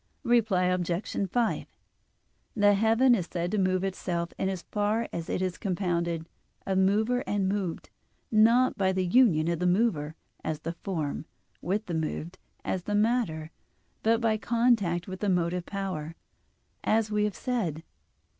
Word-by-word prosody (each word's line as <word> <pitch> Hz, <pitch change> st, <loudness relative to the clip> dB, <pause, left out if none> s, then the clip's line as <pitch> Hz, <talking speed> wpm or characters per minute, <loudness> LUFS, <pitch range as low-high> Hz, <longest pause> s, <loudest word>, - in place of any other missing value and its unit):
Reply 220 Hz, -6 st, +3 dB
Obj. 180 Hz, -1 st, 0 dB, 0.4 s
5: 235 Hz, +3 st, 0 dB, 0.9 s
The 205 Hz, -1 st, +5 dB
heaven 225 Hz, +5 st, +4 dB
is 185 Hz, -7 st, 0 dB
said 175 Hz, 0 st, -2 dB
to 215 Hz, -, +1 dB
move 185 Hz, 0 st, +1 dB
itself 175 Hz, -3 st, -2 dB
in 190 Hz, -, +1 dB
as 185 Hz, -2 st, -4 dB
far 210 Hz, +2 st, 0 dB
as 170 Hz, -1 st, -4 dB
it 185 Hz, -, -1 dB
is 185 Hz, -1 st, -3 dB
compounded 170 Hz, -4 st, -1 dB, 0.4 s
of 190 Hz, -1 st, +1 dB
mover 215 Hz, +6 st, +2 dB
and 200 Hz, -2 st, 0 dB
moved; 190 Hz, -3 st, -3 dB, 0.4 s
not 230 Hz, +4 st, +5 dB
by 190 Hz, -1 st, +2 dB
the 185 Hz, 0 st, 0 dB
union 175 Hz, -6 st, +4 dB
of 170 Hz, -1 st, 0 dB
the 180 Hz, -, +1 dB
mover, 175 Hz, -6 st, +1 dB, 0.3 s
as 155 Hz, -1 st, -3 dB
the 165 Hz, -, -4 dB
form, 165 Hz, -4 st, -4 dB, 0.4 s
with 205 Hz, +5 st, -1 dB
the 175 Hz, -, -5 dB
moved, 160 Hz, +2 st, -3 dB, 0.3 s
as 180 Hz, -2 st, -2 dB
the 205 Hz, -, -1 dB
matter, 205 Hz, -8 st, 0 dB, 0.5 s
but 225 Hz, +1 st, +3 dB
by 225 Hz, -2 st, +1 dB
contact 220 Hz, -7 st, +1 dB
with 185 Hz, 0 st, -6 dB
the 205 Hz, -, 0 dB
motive 180 Hz, -1 st, 0 dB
power, 185 Hz, -5 st, -4 dB, 0.7 s
as 220 Hz, 0 st, +1 dB
we 210 Hz, 0 st, +2 dB
have 210 Hz, -, -2 dB
said. 185 Hz, -, -2 dB
190 Hz, 155 wpm, -28 LUFS, 170-215 Hz, 0.9 s, The